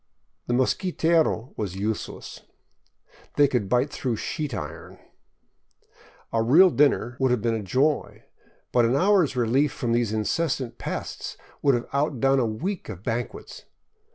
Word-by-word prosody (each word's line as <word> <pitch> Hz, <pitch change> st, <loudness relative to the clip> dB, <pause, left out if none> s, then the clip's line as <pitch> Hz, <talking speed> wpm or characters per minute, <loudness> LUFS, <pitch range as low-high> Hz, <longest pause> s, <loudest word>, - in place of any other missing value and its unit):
The 120 Hz, -, +1 dB
mosquitero 160 Hz, -, +1 dB
was 100 Hz, -4 st, -4 dB
useless. 105 Hz, +3 st, -4 dB, 0.9 s
They 145 Hz, -1 st, +5 dB
could 120 Hz, -8 st, -1 dB
bite 125 Hz, +5 st, +2 dB
through 130 Hz, -5 st, -2 dB
sheet 150 Hz, +6 st, -4 dB
iron. 75 Hz, -9 st, -7 dB, 1.4 s
A 115 Hz, -, +2 dB
real 165 Hz, +11 st, +6 dB
dinner 135 Hz, -5 st, +2 dB
would 130 Hz, -1 st, +2 dB
have 125 Hz, -3 st, 0 dB
been 115 Hz, -1 st, +1 dB
a 110 Hz, -, -2 dB
joy, 135 Hz, +9 st, 0 dB, 0.5 s
but 120 Hz, -, +4 dB
an 115 Hz, +3 st, +2 dB
hour's 185 Hz, -3 st, +3 dB
relief 125 Hz, +4 st, +2 dB
from 120 Hz, -, -3 dB
these 120 Hz, -2 st, +1 dB
incessant 130 Hz, +4 st, -1 dB
pests -, -, -5 dB, 0.2 s
would 140 Hz, -3 st, +4 dB
have 120 Hz, -, -3 dB
outdone 135 Hz, -2 st, +2 dB
a 120 Hz, -, +1 dB
week 175 Hz, -, -4 dB
of 95 Hz, +1 st, -8 dB
banquets. 120 Hz, +1 st, -5 dB
125 Hz, 140 wpm, -25 LUFS, 115-145 Hz, 1.4 s, real